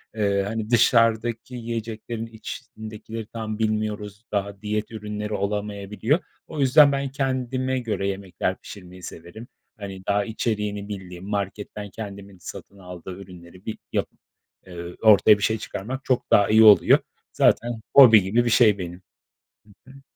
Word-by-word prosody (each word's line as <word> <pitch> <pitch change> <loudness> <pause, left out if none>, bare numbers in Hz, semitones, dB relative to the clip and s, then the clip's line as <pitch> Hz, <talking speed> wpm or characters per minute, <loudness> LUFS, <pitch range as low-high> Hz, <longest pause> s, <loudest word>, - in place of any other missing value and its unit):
Eee, 100 -2 +1
hani, 110 0 -4
dışarıdaki 115 0 +2
yiyeceklerin 115 -1 -5
içindekileri 110 -2 -8
tam 110 -1 -5
bilmiyoruz. 105 0 -2
Daha 100 0 -3
diyet 105 +1 -3
ürünleri 105 -1 -5
olamayabiliyor. 105 - -1 0.3
O 155 - -7
yüzden, 140 +2 +6
ben 140 -1 -1
kendime 130 -1 -1
göre 105 -5 -2
yemekler 95 -1 -3
pişirmeyi 90 -2 -12
severim. 85 +10 -10 0.3
Hani, 95 -2 -8
daha 100 0 +1
içeriğini 105 -2 -2
bildiğim, 95 -1 -8
marketten 100 0 -4
kendimin 100 -1 -9
satın 100 +3 -10
aldığı 90 -1 -9
ürünleri 90 -1 -13
bir 110 - -4 0.2
yapıp, - - -2 0.5
eee, 85 -1 -8
ortaya 105 -1 +7
bir 105 - -6
şey 110 0 +2
çıkarmak 130 +7 -6
çok 130 -2 0
daha 100 - +5
iyi 110 +1 +6
oluyor. 105 -2 +7 0.3
Zaten 120 -1 +2
hobi 115 -6 +9
gibi 115 +6 +1
bir - - +1
şey 110 -3 +5
benim. 90 0 -7 0.9
Hı - - -13
hı. 135 0 -15
105 Hz, 140 wpm, -24 LUFS, 100-115 Hz, 0.9 s, hobi